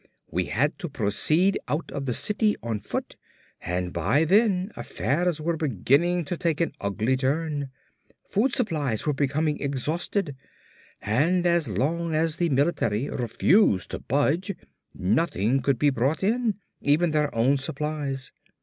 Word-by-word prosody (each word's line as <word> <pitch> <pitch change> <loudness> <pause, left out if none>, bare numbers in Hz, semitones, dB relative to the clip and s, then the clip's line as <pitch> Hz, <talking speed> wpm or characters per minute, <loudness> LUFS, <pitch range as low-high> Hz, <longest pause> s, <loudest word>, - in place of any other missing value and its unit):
We 90 +2 0
had 145 - 0
to 175 -4 -4
proceed 155 - +1
out 150 +3 -2
of 140 -2 -4
the 125 - 0
city 210 0 +1
on 115 -2 -2
foot 105 - -5 0.4
and 90 0 -3
by 105 - +2
then 195 +1 +3
affairs 170 +3 -1
were 165 +2 -1
beginning 155 - +1
to 175 +4 -3
take 165 -3 0
an 170 - +1
ugly 105 +6 0
turn. 145 +1 -1 0.6
Food 235 +7 +1
supplies 150 - -1
were 150 - +1
becoming 150 +2 0
exhausted 150 +4 -1 0.7
and 160 +12 +2
as 170 -3 +2
long 165 +4 -1
as 160 0 +1
the 170 -1 +1
military 135 -5 +1
refused 120 - +2
to - - -4
budge 145 - 0 0.4
nothing 125 - +1
could 140 -1 +1
be 145 +3 +3
brought 135 +7 0
in, 225 +1 +1 0.3
even 155 +4 +2
their 150 -3 0
own 130 +5 +3
supplies. 140 -1 -3
150 Hz, 140 wpm, -25 LUFS, 130-170 Hz, 0.7 s, then